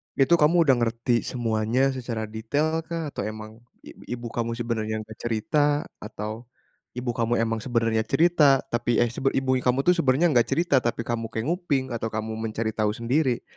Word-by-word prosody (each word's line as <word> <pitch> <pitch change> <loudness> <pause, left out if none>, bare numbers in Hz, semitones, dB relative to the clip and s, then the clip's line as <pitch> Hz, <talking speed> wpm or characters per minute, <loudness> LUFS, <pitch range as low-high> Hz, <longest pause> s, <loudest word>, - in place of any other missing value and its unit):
Itu 145 +5 +4
kamu 165 +3 +5
udah 135 -4 +4
ngerti 120 +1 +1
semuanya 120 +2 0
secara 120 -4 -4
detail 145 +9 -1
kah, 165 -2 -4
atau - - -4
emang, 110 +1 -7 0.2
ib - - -13
ibu 120 -1 -5
kamu 115 0 -2
sebenarnya 110 -2 -2
nggak 110 0 -13
cerita 145 +6 +1 0.2
atau, 110 +2 -6 0.5
ibu 125 0 -2
kamu 115 0 0
emang 115 0 -1
sebenarnya 115 -3 +1
cerita 160 -5 +4
tapi, 120 -1 0
eh, - - +5
sebe 135 +2 0
ibunya 130 -1 +1
kamu 125 +2 +2
tuh 180 - +6
sebenarnya 160 +2 +3
nggak 120 -2 +4
cerita, 165 +1 +2
tapi 120 -1 -1
kamu 115 -1 -2
kayak 110 0 -4
nguping 165 -7 0
atau 115 -1 -2
kamu 110 0 -3
mencari 110 0 -2
tahu 105 -1 +1
sendiri. 125 +2 0
120 Hz, 175 wpm, -25 LUFS, 110-135 Hz, 0.5 s, tuh